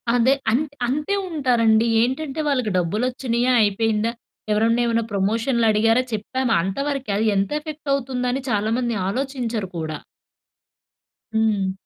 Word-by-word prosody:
అదే 245 +2 +4 0.2
అంత్ 285 +5 0
అంతే 300 +9 -1
ఉంటారండి. 235 -7 +2
ఏంటంటే 270 +5 -2
వాళ్ళకి 255 -7 0
డబ్బులొచ్చినాయా? 240 +6 0
అయిపోయిందా? 215 +2 +1 0.4
ఎవరన్నా 225 +3 +2
ఏమన్నా 230 -1 +1
ప్రమోషన్‌లడిగారా? 225 +2 +2
చెప్పామా? 230 +3 -1
అంతవరకే 270 +5 -2
అది 220 +1 +1
ఎంత 195 +4 0
ఎఫెక్ట్ 300 -1 -8
అవుతుందని 255 -1 -1
చాలామంది 225 +3 0
ఆలోచించరు 245 -3 -3
కూడా. 155 -2 -4 1.4
హ్మ్. 210 -4 +1
235 Hz, 105 wpm, -22 LUFS, 215-260 Hz, 1.4 s, అదే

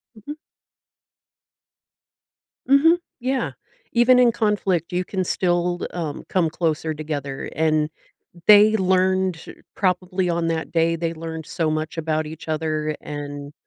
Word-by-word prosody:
Mhm. 285 +9 -9 2.3
Mhm. 310 +6 +5 0.2
Yeah. 260 +2 -1 0.4
Even 250 +1 +5
in 240 -2 +6
conflict, 205 -7 0
you 180 0 -1
can 190 -2 -2
still, 175 0 0
um, 160 -5 -4
come 175 -4 +2
closer 160 -1 -1
together, 145 -3 -5
and 155 -1 +1 0.6
they 210 +1 +8
learned 185 -1 +2
to 165 - -13
probably 180 -1 0
on 170 -1 0
that 165 -1 -2
day, 165 0 +2
they 165 0 -2
learned 160 -1 -6
so 160 -2 -1
much 155 +1 -3
about 155 -1 -1
each 160 +1 -9
other 155 -1 -1
and 145 -1 -7
170 Hz, 125 wpm, -22 LUFS, 155-190 Hz, 2.3 s, they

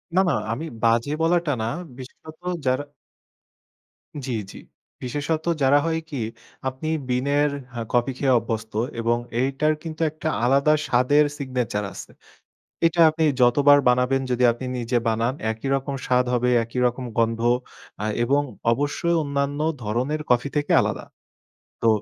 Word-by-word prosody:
না, 190 - +6
না - - +2 0.2
আমি 125 +8 -3 0.2
বাজে 115 +4 +2
বলাটা 170 -1 +2
না, - - -1 0.3
বিশেষত 155 +4 -12 0.3
যারা 130 +2 +1 1.4
জ্বি, 130 - -3 0.2
জ্বি। - - -11 0.4
বিশেষত 145 +5 -2 0.2
যারা 140 +2 +5
হয় 160 0 0
কি? 135 -4 -4 0.5
আপনি 130 +4 -4 0.2
বিনের 140 +4 +2 0.2
হ্যাঁ, 115 -2 -5
কফি 120 +2 +2
খেয়ে 130 -2 +3
অভ্যস্ত 110 -1 -5 0.3
এবং 120 +1 +2 0.2
এইটার 140 +4 +1
কিন্তু 160 -1 -6
একটা 155 +1 -6 0.2
আলাদা 140 +4 +4
স্বাদের 130 +5 +4
সিগনেচার 125 -7 -2
আছে। - - -9 0.7
এটা 165 +1 +1
আপনি 160 +1 -1 0.2
যতবার 145 +4 +6
বানাবেন 125 +2 +2
যদি 125 0 +1
আপনি 120 +3 -6
নিজে 120 0 0
বানান 115 +2 +1 0.2
একই 110 +4 -6
রকম 135 +1 -3
স্বাদ 125 -1 +2
হবে, 125 0 +2
একই 115 +2 -5
রকম 125 +1 -1
গন্ধ 115 0 +1 0.6
আ - - -1 0.2
এবং 140 +4 +2 0.3
অবশ্যই 145 +6 0
অন্যান্য 140 0 -2 0.2
ধরনের 125 +8 -1
কফি 125 +3 +2
থেকে 145 - -1
আলাদা। - - -3 0.8
তো 115 - +4
130 Hz, 140 wpm, -23 LUFS, 120-145 Hz, 1.4 s, না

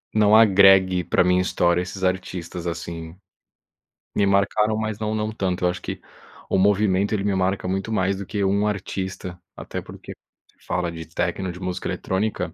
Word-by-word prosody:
não 105 0 +5
agregue 95 -4 +6
pra - - +2
minha 90 0 +3
história 85 -1 +1
esses 95 +1 -7
artistas 90 -2 -3
assim, 85 -1 -6 1.0
me 100 - +3
marcaram, 100 +2 +2
mas 110 -1 -3
não 110 0 -2
não 110 0 -2
tanto. 95 -4 -2
Eu - - +4
acho 90 - -4
que - - -6 0.5
o - - +2
movimento, 100 0 +2
ele 100 -2 0
me 100 -1 +1
marca 95 0 0
muito 95 +4 -2
mais 95 -2 +1
do 100 - -6
que 100 0 -2
um 100 +2 +2
artista, 95 -3 -4 0.2
até - - -6
porque - - -10 0.3
se - - -28
fala 90 -1 -1
de 80 0 -8
techno, 90 +3 -2
de 90 - -10
música 90 -1 -4
eletrônica, 100 +3 -2
95 Hz, 175 wpm, -23 LUFS, 90-100 Hz, 1.0 s, agregue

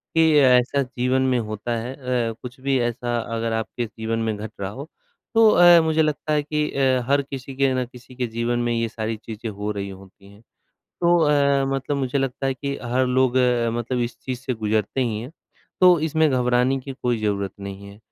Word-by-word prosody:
कि 165 - +5 0.2
ऐसा 130 +1 +4
जीवन 125 +1 0
में 130 -1 +2
होता 110 +1 -5
है 120 +3 -5 0.4
अ, - - -4
कुछ 125 +1 -9
भी 135 -1 +1
ऐसा 120 0 -1 0.2
अगर 115 0 -2
आपके 110 +2 -3
जीवन 110 0 -4
में 110 -1 -1
घट 110 +1 -7
रहा 95 -1 -3
हो, 140 +8 -9 0.5
तो 225 -1 +7
अ, 175 -3 +7
मुझे 160 0 +2
लगता 155 0 -1
है 150 -1 +1
कि 150 0 -1
अ, 130 -2 +2
हर 140 0 +4
किसी 135 -1 -8
के 135 -1 +2
ना 130 -1 -1
किसी 125 +1 -15
के 125 -1 -2
जीवन 115 +1 -1
में 120 0 0
ये 115 0 0
सारी 110 -1 -4
चीज़ें 110 0 -6
हो 105 +1 -4
रही 100 -1 -4
होती 95 +1 -14
हैं। 100 - -18 0.6
तो 175 0 +5
अ, 140 -3 +3
मतलब 135 +2 -2
मुझे 135 0 -1
लगता 135 0 -2
है 135 - 0
कि 140 +2 -4
हर 125 +2 +1
लोग 130 0 +2 0.4
मतलब 125 +2 -2
इस 120 0 -3
चीज़ 130 -2 -4
से 130 -1 -3
गुजरते 110 +2 -1
ही 115 -4 -1
हैं, 125 +5 -8 0.5
तो 180 -2 +7
इसमें 160 -1 +2
घबराने 125 +1 +2
की 135 +1 -7
कोई 120 -2 +1
ज़रूरत 100 -2 -1
नहीं 100 0 -8
है। 100 +1 -13
125 Hz, 210 wpm, -23 LUFS, 115-140 Hz, 0.6 s, तो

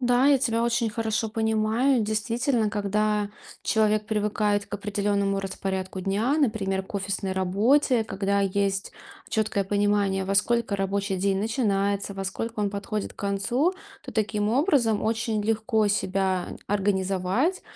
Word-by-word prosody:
Да, 245 +1 +3
я 285 -1 +5
тебя 230 -2 0
очень 235 -1 +1
хорошо 225 -1 -1
понимаю. 220 +4 +2
Действительно, 225 +2 0
когда 210 0 0 0.3
человек 215 -1 +2
привыкает 210 -1 0
к - - -6
определённому 200 -1 0
распорядку 190 -1 -4
дня, 205 +9 0
например, 205 -8 0
к 190 - -14
офисной 195 -1 -2
работе, 220 +7 +2
когда 200 -1 0
есть 195 0 0 0.4
чёткое 215 -2 0
понимание, 200 -1 +1
во 195 +1 -1
сколько 235 0 +2
рабочий 195 0 -1
день 195 +1 +1
начинается, 200 -3 0
во 195 0 -5
сколько 225 +3 -4
он 205 -1 0
подходит 205 +1 -4
к - - -37
концу, 205 - 0 0.3
то 265 - -8
таким 210 -1 0
образом 255 - +2
очень 225 -1 0
легко 220 0 +1
себя 190 -2 0 0.2
организовать, 195 - 0
210 Hz, 135 wpm, -26 LUFS, 195-225 Hz, 0.4 s, я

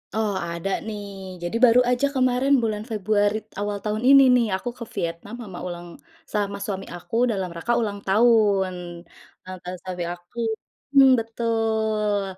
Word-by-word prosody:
Oh, 215 -2 0
ada 170 +3 -4 0.2
nih, 205 -2 -5 0.4
jadi 175 +6 -3
baru 240 +1 +6
aja 250 +3 +2
kemarin 255 +2 +2
bulan 215 -1 -1
Februari 210 0 +1 0.2
awal 205 0 -2
tahun 215 +2 -2
ini 275 0 +9
nih, 240 -2 +3
aku 245 +6 -4
ke - - -6
Vietnam 170 +5 -4
sama 190 -6 -8
ulang 175 0 -7 0.5
sama 200 -1 -1
suami 195 -2 -4
aku 175 +4 -8 0.2
dalam 190 -4 -2
rangka 235 +8 -1
ulang 205 -2 -2
tahun. 205 -3 +4 0.7
Ulang 185 0 -8
tahun 180 +1 -4
suami 180 -1 -4
aku, 175 +5 -17 0.6
mmm, 270 -1 +8
betul. 220 -2 0
210 Hz, 150 wpm, -24 LUFS, 190-225 Hz, 0.7 s, ini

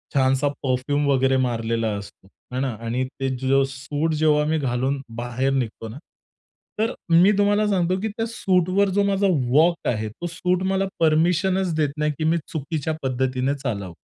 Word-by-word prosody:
छानसा 135 +1 +3 0.2
परफ्यूम 140 +3 0
वगैरे 135 -1 +3
मारलेला 115 -1 -1
असतो 100 -1 -12 0.3
हे 130 - -1
ना? 135 -2 0
आणि 120 +3 -1
ते 135 0 0 0.2
जो 135 0 +4
सूट 145 +4 -3
जेव्हा 150 -1 +3
मी 160 +1 +1
घालून 135 +1 -1 0.2
बाहेर 125 +3 -1
निघतो 115 -3 -3
ना, 120 - -9 0.8
तर 225 +3 +1 0.3
मी 200 +3 +6
तुम्हाला 205 +1 +3
सांगतो 185 -2 +1
की 220 - -1
त्या 225 +2 -3
सूटवर 190 -2 +1
जो 200 - +4
माझा 200 0 +2 0.2
वॉक 165 +6 +3
आहे, 110 -2 -2
तो 175 +11 -6
सूट 180 +2 -1
मला 195 0 +1
परमीशनच 170 +3 +2
देत 150 -2 +1
नाही 150 0 +1
की - - -1
मी 165 +2 +2
चुकीच्या 155 0 -3
पद्धतीने 130 +1 0
चालावं. 100 -9 -4
145 Hz, 165 wpm, -23 LUFS, 130-175 Hz, 0.8 s, मी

